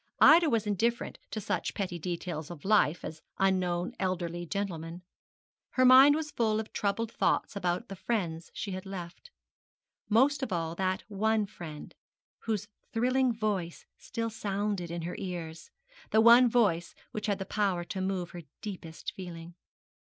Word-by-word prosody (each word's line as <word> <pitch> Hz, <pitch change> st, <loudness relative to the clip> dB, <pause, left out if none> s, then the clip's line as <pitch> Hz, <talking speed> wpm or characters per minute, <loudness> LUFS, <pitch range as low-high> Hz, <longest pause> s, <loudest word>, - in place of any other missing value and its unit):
Ida 330 Hz, 0 st, +8 dB
was 225 Hz, -4 st, +1 dB
indifferent 230 Hz, +4 st, -1 dB
to 220 Hz, -, -4 dB
such 205 Hz, -, -2 dB
petty 180 Hz, -4 st, -3 dB
details 170 Hz, -2 st, -4 dB
of 170 Hz, -3 st, -9 dB
life 195 Hz, -6 st, +3 dB
as 155 Hz, 0 st, -7 dB, 0.2 s
unknown 180 Hz, -2 st, +1 dB
elderly 175 Hz, -2 st, -2 dB
gentlemen. 175 Hz, -3 st, -4 dB, 0.7 s
Her 255 Hz, -, +4 dB
mind 265 Hz, +3 st, +9 dB
was 305 Hz, -1 st, -3 dB
full 220 Hz, -2 st, +1 dB
of 220 Hz, -, -6 dB
troubled 215 Hz, +3 st, -1 dB
thoughts -, -, 0 dB
about 180 Hz, -2 st, -1 dB
the 195 Hz, -, -7 dB
friends 175 Hz, -6 st, -2 dB
she 200 Hz, -, -4 dB
had 185 Hz, +1 st, -6 dB
left 180 Hz, -, -8 dB, 0.8 s
most 265 Hz, +6 st, +4 dB
of 260 Hz, -5 st, -3 dB
all 165 Hz, -2 st, -1 dB
that 185 Hz, +1 st, -1 dB
one 215 Hz, +1 st, +1 dB
friend 165 Hz, -7 st, -9 dB, 0.5 s
whose 210 Hz, -3 st, -1 dB, 0.2 s
thrilling 255 Hz, +2 st, +2 dB
voice 205 Hz, -7 st, -2 dB
still 230 Hz, -1 st, -4 dB
sounded 200 Hz, -4 st, -2 dB
in 170 Hz, 0 st, -4 dB
her 175 Hz, -, -4 dB
ears 170 Hz, -, -6 dB, 0.4 s
that 220 Hz, -, +4 dB
one 235 Hz, +2 st, +8 dB
voice 200 Hz, -8 st, +2 dB, 0.2 s
which 215 Hz, +1 st, -4 dB
had 195 Hz, -2 st, -1 dB
power 195 Hz, -5 st, 0 dB
to 190 Hz, +2 st, -5 dB
move 185 Hz, -2 st, -2 dB
her 175 Hz, -, -7 dB, 0.2 s
deepest 175 Hz, -6 st, -6 dB
feeling. 175 Hz, -2 st, -8 dB
195 Hz, 155 wpm, -30 LUFS, 175-220 Hz, 0.8 s, mind